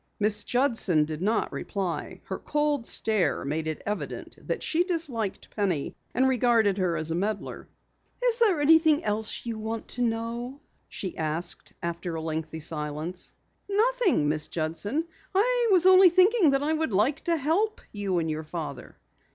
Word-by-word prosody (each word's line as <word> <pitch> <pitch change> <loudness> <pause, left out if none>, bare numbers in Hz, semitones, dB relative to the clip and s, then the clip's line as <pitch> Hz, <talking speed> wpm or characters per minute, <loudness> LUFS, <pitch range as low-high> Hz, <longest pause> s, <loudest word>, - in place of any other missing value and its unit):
Miss 210 0 +2
Judson 225 - +2
did 155 +1 -6
not 215 +4 0
reply. 190 -5 -4
Her - - -5
cold 295 -4 0
stare 215 -9 +1
made 155 +3 -2
it 155 - -4
evident 210 +1 -4
that - - -2
she 340 +2 +2
disliked 290 - -3
Penny 185 -9 -1 0.2
and 260 +1 +4
regarded 230 -6 +3
her 175 -3 +1
as 155 +1 0
a - - 0
meddler. 200 +3 -3 0.6
"Is 485 -1 +2
there 410 -9 +4
anything 315 +1 +5
else 210 +2 -2
you 230 -2 -4
wish 220 +1 -4
to 245 - -5
know?" 235 +3 -2 0.3
she 190 -3 -5
asked 160 +2 -3
after 170 0 -3
a 160 - -3
lengthy 160 0 -4
silence. 150 +3 -4 0.4
"Nothing, 430 - +2
Miss 150 0 -1
Judson. 175 - -2 0.3
I 480 +4 +3
was 365 -3 +4
only 375 0 +8
thinking 370 +1 +5
that 275 0 +2
I 310 +2 +1
would 315 -7 -1
like 225 +9 +2
to 340 -1 +2
help 360 +10 0
you 200 -3 -1
and 165 -1 0
your 155 0 -3
father." 155 -2 -7
220 Hz, 160 wpm, -27 LUFS, -, 0.6 s, only